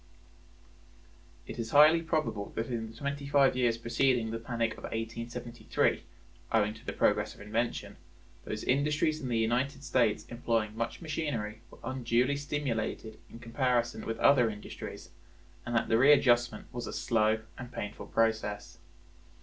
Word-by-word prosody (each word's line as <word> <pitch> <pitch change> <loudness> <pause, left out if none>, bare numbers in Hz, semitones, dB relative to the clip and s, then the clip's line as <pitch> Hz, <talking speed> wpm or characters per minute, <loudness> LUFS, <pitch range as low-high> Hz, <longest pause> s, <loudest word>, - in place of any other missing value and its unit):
It - - -8
is 115 -1 -3
highly 155 +4 +7
probable 155 -11 -2
that 115 +3 -3
in 115 -2 -3
the 115 - -13
twenty 140 +1 -4
five 140 -2 +4
years 120 -2 +2
preceding 115 0 +1
the 115 - -3
panic 115 -1 -1
of - - -10
1873, 115 +1 -2 0.5
owing 105 -1 +2
to 110 - -15
the - - -4
progress - - +1
of - - -14
invention, 105 -1 -2 0.5
those 110 0 -5
industries 150 +3 +1
in 130 - -4
the 120 -2 0
United 125 +5 0
States 120 -6 +1
employing 115 -3 -1
much 115 +7 -3
machinery 140 -10 -3
were - - -15
unduly 125 +2 +1
stimulated 125 -6 -3
in - - -11
comparison 120 -1 0
with 115 - -2
other 125 -5 +5
industries, 105 -4 -8 0.6
and 120 - -2
that 115 - +2
the 115 - +3
readjustment 120 -5 +4
was 120 -1 -4
a - - -5
slow 110 -1 +1
and 125 -1 -9
painful 105 -3 -6
process. 105 -6 -1
115 Hz, 150 wpm, -30 LUFS, 110-135 Hz, 0.6 s, highly